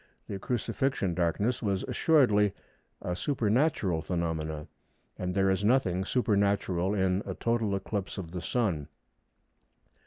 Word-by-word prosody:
The 100 - -5
Crucifixion 125 -3 -1
darkness 90 +8 0
was 100 -3 0
assuredly 105 -11 +3 0.5
a 90 - -2
supernatural 110 - +1
phenomenon, 80 -4 -3 0.5
and 90 0 -2
there 95 -1 +3
is 95 +2 0
nothing 95 -6 +2
supernatural 100 -5 +1
in 95 -1 +1
a - - -5
total 115 -4 0
eclipse 100 +1 -3
of 85 -4 -6
the 90 -1 -4
Sun. 85 - -1
100 Hz, 120 wpm, -29 LUFS, 90-110 Hz, 0.5 s, assuredly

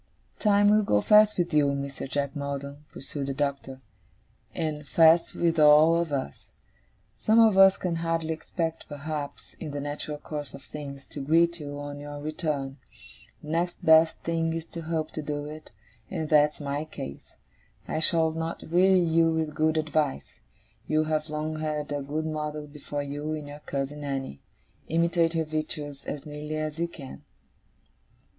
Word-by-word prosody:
'Time 205 -1 +4
will 215 0 +5
go 105 - +2
fast 210 - +5
with 175 -2 0
you, 150 -1 +4
Mr. 140 -1 -3
Jack 140 0 -2
Maldon,' 140 0 -5
pursued 140 0 -6
the 135 - -3
Doctor, 140 -2 -3 0.7
'and 150 -2 -3
fast 165 +2 +5
with 165 -1 +1
all 150 +2 +7
of 170 -2 0
us. 130 - -4 0.7
Some 220 +1 +4
of 220 -3 +6
us 195 0 +7
can 175 -2 -2
hardly 165 -1 -1
expect, 165 0 -4
perhaps, 145 0 -5
in 160 - -5
the 145 0 -4
natural 145 +1 -4
course 145 -1 -6
of 140 - -12
things, 140 -2 -8
to - - -7
greet 170 +4 +3
you 145 -1 -6
on 145 0 -6
your 145 0 -7
return. 150 -3 -3 0.7
The 150 - -9
next 170 +2 -1
best 160 0 +6
thing 165 -1 0
is 165 0 -4
to 170 - -5
hope 160 -1 -2
to 155 - -4
do 145 0 -4
it, 155 +1 -9 0.4
and 160 - -3
that's 150 -1 +4
my 145 0 -2
case. 70 - -9 0.5
I - - -1
shall 160 0 +3
not 165 +1 -4
weary 185 +1 +5
you 165 0 +3
with 160 -1 -1
good 155 +1 +1
advice. 155 -2 -1 0.5
You 155 0 +2
have 155 0 -1
long 155 +1 -3
had 150 -1 -3
a 145 0 -1
good 150 +3 -3
model 150 -1 -3
before 145 0 -5
you, 145 +2 -4
in 155 -1 -5
your 145 +1 -9
cousin 140 +1 -4
Annie. 135 - -4 0.5
Imitate 170 0 +2
her 160 -1 +1
virtues 150 -2 -4
as 145 0 -5
nearly 150 +1 -5
as 155 0 -3
you 170 - +1
can. 140 -6 -10
155 Hz, 170 wpm, -27 LUFS, 145-165 Hz, 0.7 s, all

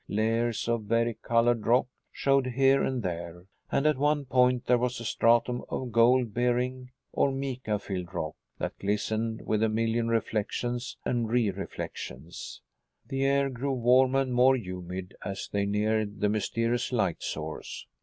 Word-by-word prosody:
Layers 115 +2 0
of 115 -2 0
vari 115 +2 +1
colored 115 -1 +2
rock 125 +3 +4 0.3
showed 135 -1 +2
here 135 +2 +3
and 130 -3 -1
there, 85 -1 -5 0.3
and, 140 - +1
at 150 -3 +3
one 145 0 +2
point 125 -1 +3
there 125 0 +3
was 125 0 -1
a 115 - -7
stratum 120 +2 +2
of 130 -2 -3
gold 115 0 +4
bearing 125 +1 0 0.2
or 140 - +2
mica 130 -5 -2
filled 95 -3 -5
rock 80 -4 -4 0.2
that - - -4
glistened 110 +2 -1
with 110 -1 0
a 110 - +3
million 115 +1 0
reflections 115 +2 -2
and 120 -3 0
re 115 -3 +2
reflections. 85 -5 -7 0.5
The 135 0 0
air 140 0 +2
grew 135 +2 -2
warmer 130 +2 +4
and 130 -2 -2
more 130 +2 +5
humid 90 -3 -6
as 100 -1 -4
they 100 0 0
neared 105 0 0
the 105 - +2
mysterious 115 +3 0
light 100 -9 0
source. - - -5
115 Hz, 155 wpm, -28 LUFS, 105-125 Hz, 0.5 s, more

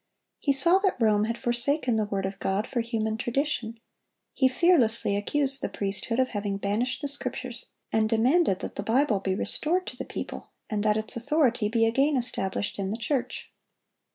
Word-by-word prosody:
He 285 - +1
saw 335 +8 +7
that 390 -8 0
Rome 215 -2 +3
had 230 +1 -3
forsaken 240 +2 +1
the 215 -1 +1
word 195 -2 -3
of 195 0 -5
God 195 +3 -1
for 245 - -2
human 220 -2 -2
tradition; 240 -2 -2 0.5
he 265 - +3
fearlessly 255 - +2
accused 270 +6 +3
the - - -2
priesthood 200 +4 -2
of 260 0 +2
having 205 -2 -3
banished 235 +8 -2
the - - 0
Scriptures, 255 -3 -4 0.2
and 220 -1 +1
demanded 235 - +2
that - - -7
the - - -2
Bible 225 0 +1
be 190 -1 -2
restored 350 - 0
to - - -7
the - - -5
people, - - -7 0.2
and 210 -1 -1
that 210 0 +2
its 215 0 -4
authority 240 -3 +1
be 225 0 +2
again 270 +5 +2
established 205 -5 -2
in 190 -1 -2
the 215 - -3
church. 250 +2 -3
230 Hz, 180 wpm, -26 LUFS, 210-270 Hz, 0.5 s, saw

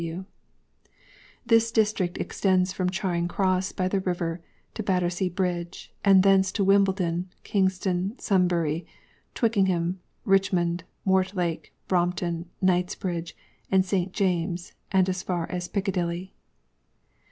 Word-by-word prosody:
(S.W.) 170 +3 -5 1.2
This 230 -1 +4
District 210 -5 +1
extends 185 -1 +1
from 185 -1 0
Charing 180 -3 -1
Cross 185 0 0
by 185 - 0
the 195 +1 0
river 175 -2 -2 0.3
to - - -4
Battersea 180 -2 0
bridge; 175 -1 -3
and 195 -2 +6
thence 190 -1 +4
to 205 - +1
Wimbledon, 190 -3 +2
Kingston, 190 +1 0
Sunbury, 175 -4 +1 0.5
Twickenham, 190 -6 +1 0.3
Richmond, 180 -3 +2 0.2
Mortlake, 185 -3 0 0.2
Brompton, 175 -1 0
Knightsbridge, 180 -2 0 0.3
and 190 -1 +3
St. 185 -1 0
JamesŌĆÖs, 175 -2 -1 0.4
as 185 0 -1
far 175 -3 -2
as 180 -1 -3
Piccadilly. 185 -2 -2
185 Hz, 105 wpm, -26 LUFS, 175-195 Hz, 1.2 s, and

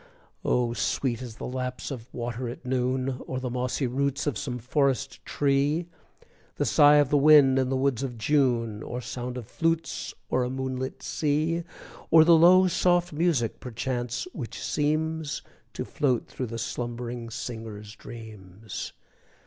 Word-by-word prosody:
Oh, 120 -1 +1
sweet 120 0 -1
as 120 -4 -7
the - - -7
lapse 125 +2 -4
of 125 -3 -7
water 120 +1 -4
at 120 - -9
noon 130 0 -1
O'er 130 - -2
the 125 -1 -4
mossy 125 +2 -1
roots 140 +2 -1
of 145 -5 0
some 130 -1 -3
forest 135 +2 0
tree, 145 +4 +1 0.7
The - - 0
sigh 145 0 +6
of 145 -2 +4
the 145 - +5
wind 140 -3 +7
in 130 -1 +1
the 135 - +1
woods 130 -2 +1
of 125 -3 -4
June, 115 -4 +1
Or 120 - -5
sound 125 0 -5
of 120 - -6
flutes 165 +6 -1 0.2
o'er 130 - +3
a 125 - -1
moonlight 130 0 -4
sea, 155 +3 0 0.5
Or 160 -1 +8
the 170 - +7
low 180 +3 +7
soft 175 -1 +2
music, 150 -7 +1
perchance, 125 +2 -3
which 125 -7 -6
seems 155 +1 -1 0.3
To - - -4
float 130 -5 0
through 130 - -5
the 115 +1 -5
slumbering 120 0 -4
singer's 110 -2 -7
dreams. 110 -4 -8
130 Hz, 155 wpm, -27 LUFS, 120-145 Hz, 0.7 s, Or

